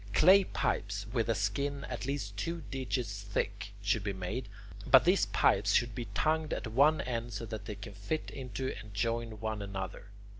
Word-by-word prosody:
Clay 190 +4 +7
pipes 100 - -1
with 115 -2 +1
a 115 - +3
skin 140 +9 -1
at 125 0 -4
least 135 -8 -3
two 165 +10 -3
digits 115 -5 -2
thick 100 +1 -3
should 100 +1 +1
be 100 -1 -1
made, 95 +5 -4 0.4
but 130 +3 +8
these 185 +3 +4
pipes - - +3
should 120 -1 +3
be 120 0 -4
tongued 155 0 +1
at - - -3
one 140 +8 +4
end 120 -1 -3
so 110 +3 -4
that 110 -1 -6
they 105 - -5
can 100 0 -9
fit 100 +11 -3
into 130 -1 -4
and 105 -2 -11
join 115 +1 -1
one 110 -1 -2
another. 95 -2 -5
115 Hz, 185 wpm, -32 LUFS, 100-135 Hz, 0.4 s, but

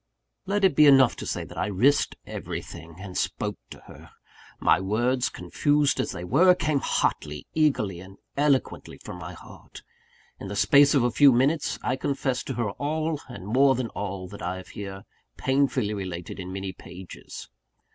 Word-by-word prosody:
Let 205 +1 0
it 190 -7 +4
be 150 +1 +7
enough 135 -2 +6
to - - -6
say - - -2
that - - -9
I - - 0
risked 125 +9 +2
everything, 80 +1 -7
and 95 -1 -9
spoke 100 +3 -2
to - - -12
her. - - -14 0.5
My - - +4
words, 120 +6 0
confused 145 -1 +1
as - - -1
they 90 - -6
were, 175 - +5
came 155 -5 0
hotly, 75 - -1
eagerly, 135 - +1
and 95 +2 -13 0.2
eloquently 140 -2 0
from - - -9
my - - -7
heart. - - -13 0.6
In - - -7
the 100 - -5
space 140 +7 +5
of 135 - +4
a 120 - +2
few 140 +3 +6
minutes, 140 +5 +1
I 125 +1 0
confessed 135 -2 -2
to 135 - -3
her 110 -3 -1
all, 155 +4 -2
and 120 -7 -9
more 135 +5 +4
than 125 -2 -3
all, 95 -2 -5
that 100 - -10
I 90 +2 -3
have 95 - -11
here 95 -1 -7 0.3
painfully 130 -6 +1
related 90 -3 -6
in 90 0 -6
many 95 0 -5
pages. 90 0 -11
120 Hz, 175 wpm, -26 LUFS, 95-140 Hz, 0.6 s, be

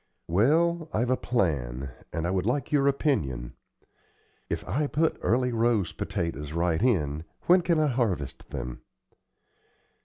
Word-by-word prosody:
"Well, 160 - +2
I've 120 +3 +1
a - - +4
plan, 70 - -1 0.2
and 85 +2 -1
would 95 +1 0
like 130 +2 -1
your 140 -2 +3
opinion. 75 - 0 1.0
If - - -3
I 145 +9 0
put 160 +3 0
Early 125 +2 +2
Rose 115 -4 +1
potatoes 75 -3 -3
right 85 0 +1
in, 80 - +1 0.2
when 180 +1 +5
can 170 -1 +2
I 155 - +3
harvest 105 - -1
them?" - - -5
110 Hz, 130 wpm, -27 LUFS, -, 1.0 s, when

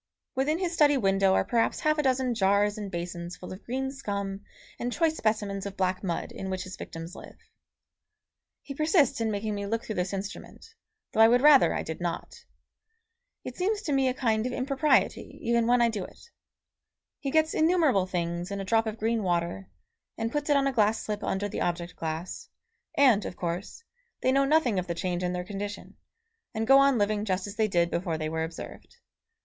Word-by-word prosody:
Within 285 +5 +1
his 350 -1 -2
study 295 -3 +4
window 195 -3 +3
are - - +2
perhaps 230 -1 +1
half 305 0 +2
a - - +5
dozen 260 -2 +1
jars 205 -1 +2
and 210 -2 -5
basins 175 -1 -5
full 180 - -8
of 185 - -11
green 265 +2 -2
scum 200 -7 -4 0.4
and 245 - -2
choice 320 +3 +1
specimens 205 -5 -1
of 200 - -9
black 185 0 0
mud 175 -3 -3
in 190 - -6
which 185 -1 -3
his 185 0 -8
victims 165 +2 -8
live. - - -11 1.3
He 280 - -7
persists 305 -3 +2
in 225 - +1
making 210 0 -2
me 200 0 -4
look 230 +2 -2
through 220 - -4
this 180 +1 -1
instrument, 195 +1 -7 0.5
though - - -3
I 225 - +9
would 245 +2 +4
rather 295 -2 +7
I - - -2
did 160 +1 -6
not. 175 -1 -5 1.0
It - - -7
seems 410 +3 0
to 310 - -2
me 270 -1 +3
a 255 - 0
kind 225 -3 +1
of - - -4
impropriety 275 +4 +1
even 235 0 +2
when 245 0 +4
I 235 - +4
do 210 -4 -3
it. 470 - -14 0.9
He 275 - -3
gets 315 +2 +2
innumerable 315 - +3
things 175 0 -3
in 200 0 -4
a 195 - -4
drop 225 +2 +2
of 220 0 -4
green 225 +1 0
water, 175 0 -1 0.5
and 230 0 -2
puts 295 +1 -2
it 290 - +5
on 275 - +2
a 275 - +1
glass 220 -1 +2
slip 210 0 -4
under 195 +2 -1
the - - -5
object 175 0 -2
glass, 160 +2 -5 0.5
and, 250 -8 +5
of - - -6
course, 175 - -4 0.4
they 260 - +4
know 275 +1 +3
nothing 275 -9 +3
of 180 - -4
the 170 - -2
change 175 +1 -2
in 180 0 -1
their 180 0 -3
condition, 205 +1 -6 0.6
and 220 0 -1
go 270 +3 +7
on 275 -2 +4
living 210 0 +1
just 185 -3 -1
as 205 0 -7
they 220 -1 +2
did 175 -3 +1
before 170 -2 -1
they 155 0 -3
were 160 0 -2
observed. 165 - -8
210 Hz, 205 wpm, -28 LUFS, 185-265 Hz, 1.3 s, I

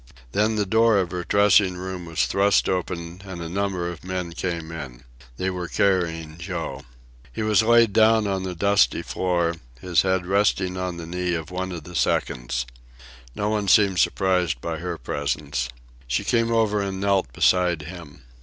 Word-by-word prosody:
Then 105 - +1
the 105 -1 +1
door 110 +2 +4
of 90 -3 0
her 90 -1 -3
dressing 100 -1 +4
room 90 -1 -6
was 80 - 0
thrust 100 +1 +2
open 85 -1 -3
and 95 -3 -8
a 85 - -5
number 95 0 -2
of 85 -3 -7
men 90 -2 -4
came 85 -2 -4
in. 70 -7 -8 0.3
They 95 0 -1
were 90 -1 -4
carrying 85 -4 0
Joe. 85 - -5 0.5
He - - -4
was 110 0 +4
laid 115 -1 +4
down 110 0 +4
on 95 -1 -1
the 95 -1 -4
dusty 95 -9 +2
floor, 85 -2 0 0.3
his 85 +3 +2
head 95 -1 0
resting 95 -1 +1
on 90 -1 -3
the 85 - -7
knee 90 +1 -2
of 80 +1 -5
one 95 +1 -3
of 85 -3 -6
the 90 - -11
seconds. - - -1 0.7
No 105 - -1
one 105 -2 -1
seemed 95 -1 +4
surprised 90 -8 +1
by 80 +3 -4
her 90 -1 -4
presence. 70 -1 -3 0.4
She 60 0 0
came 115 -2 +1
over 110 -3 +2
and 95 -1 -3
knelt 95 -8 +1
beside 90 +3 +2
him. 80 -4 -11
90 Hz, 175 wpm, -24 LUFS, 85-100 Hz, 0.7 s, door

